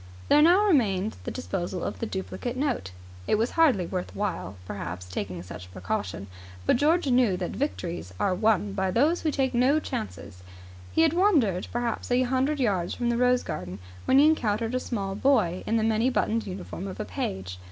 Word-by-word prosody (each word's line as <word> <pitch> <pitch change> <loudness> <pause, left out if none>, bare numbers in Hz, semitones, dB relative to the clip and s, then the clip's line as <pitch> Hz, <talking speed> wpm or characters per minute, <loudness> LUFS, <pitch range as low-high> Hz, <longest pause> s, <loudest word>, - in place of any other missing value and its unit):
There 295 - +6
now 360 +6 +6
remained 220 - +2
the - - -2
disposal 185 -7 -4
of - - -4
the 230 - -2
duplicate 235 +6 -4
note. 270 - -1 0.4
It - - +3
was 225 +3 0
hardly 275 - +3
worth 180 +1 -4
while, 185 - -3
perhaps, 90 -1 -6
taking 90 -1 -5
such 90 0 -9
a - - -17
precaution, 95 +1 -4 0.4
but - - +4
George 320 +6 +3
knew 245 -7 +3
that 180 -1 -3
victories 175 - -3
are 195 - +2
won 205 0 +1
by 190 -1 0
those 290 - +2
who 320 - +1
take 270 -3 0
no 255 +5 +3
chances. 90 - -6 0.5
He 325 - +3
had 320 -1 +3
wandered 295 - +2
perhaps 240 -1 -2
a 250 +1 +3
hundred 265 +4 0
yards 195 -8 0
from 240 -1 -1
the 235 - 0
rose 250 0 +3
garden 90 +1 -5 0.3
when 260 - +4
he 285 - +7
encountered 230 -7 +1
a 255 - +1
small 200 -6 -3
boy 210 -6 +2
in 225 - +2
the 220 - +1
many 225 +3 +2
buttoned 225 -3 0
uniform 190 0 -6
of 190 - -7
a - - -2
page. 90 0 -4
220 Hz, 195 wpm, -27 LUFS, 180-260 Hz, 0.5 s, he